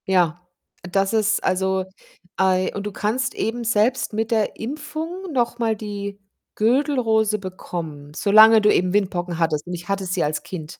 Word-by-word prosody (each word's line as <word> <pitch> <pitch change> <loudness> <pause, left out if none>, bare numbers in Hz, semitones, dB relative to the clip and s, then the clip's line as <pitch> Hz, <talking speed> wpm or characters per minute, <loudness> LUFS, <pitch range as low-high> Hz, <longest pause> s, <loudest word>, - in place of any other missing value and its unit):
Ja, 180 -2 +1 0.4
das 195 +3 0
ist 215 -1 +2
also, 190 0 0 0.5
ei 185 -1 +2
und 200 - -4
du 210 - -3
kannst 225 +5 -2
eben 235 +2 -2
selbst 230 +2 +1
mit 225 +1 -2
der 220 -2 +1
Impfung 315 +8 -5
noch 240 -3 0
mal 225 -2 +1
die 200 -1 -6 0.4
Gürtelrose 225 -3 +2
bekommen, 165 -6 -7
solange 215 +3 +7
du 210 0 +4
eben 180 +1 +1
Windpocken 180 -4 -1
hattest, 160 -1 0
und 180 - -5
ich 175 +2 -7
hatte 195 -1 -1
sie 180 0 -1
als 150 +1 -1
Kind. 160 -4 -8
205 Hz, 160 wpm, -22 LUFS, 180-225 Hz, 0.5 s, solange